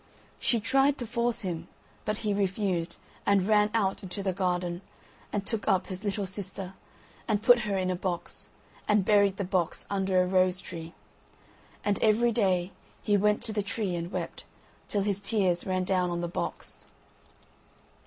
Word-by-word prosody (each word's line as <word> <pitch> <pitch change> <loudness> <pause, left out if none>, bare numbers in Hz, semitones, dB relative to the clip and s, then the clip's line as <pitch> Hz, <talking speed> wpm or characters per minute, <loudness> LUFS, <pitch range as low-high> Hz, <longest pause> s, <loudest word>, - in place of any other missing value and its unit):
She 235 - +3
tried 270 +5 +3
to 245 - -4
force 235 0 0
him, 170 -4 -4 0.4
but 215 0 -1
he 210 - +2
refused, 190 -3 -1 0.3
and 200 -2 +3
ran 210 -1 +4
out 200 -4 0
into 195 +1 -4
the 190 -1 0
garden, 180 -1 -1 0.5
and 200 -1 -2
took 225 -3 0
up 190 -3 +3
his 190 +1 -6
little 200 -1 -1
sister, 190 0 -5 0.5
and 215 -2 0
put 245 -1 +7
her 200 - +1
in 185 -1 0
a - - 0
box, 175 -1 -4 0.4
and 210 -2 +3
buried 200 -2 +4
the 200 - -1
box 180 -3 -1
under 190 -2 +2
a - - -1
rose 185 0 +3
tree; 165 -2 -8 0.9
and 205 -1 +1
every 225 +2 +4
day 190 -5 +2 0.3
he 205 - +3
went 210 +1 +2
to 220 - +1
the 210 - +1
tree 200 -2 -2
and 170 +1 -4
wept, - - -4 0.4
till 200 -2 0
his 200 -1 0
tears 195 -5 +1
ran 185 -1 +1
down 180 -1 +1
on 175 0 -2
the 175 - -1
box. 170 - -4
195 Hz, 175 wpm, -29 LUFS, 185-210 Hz, 0.9 s, put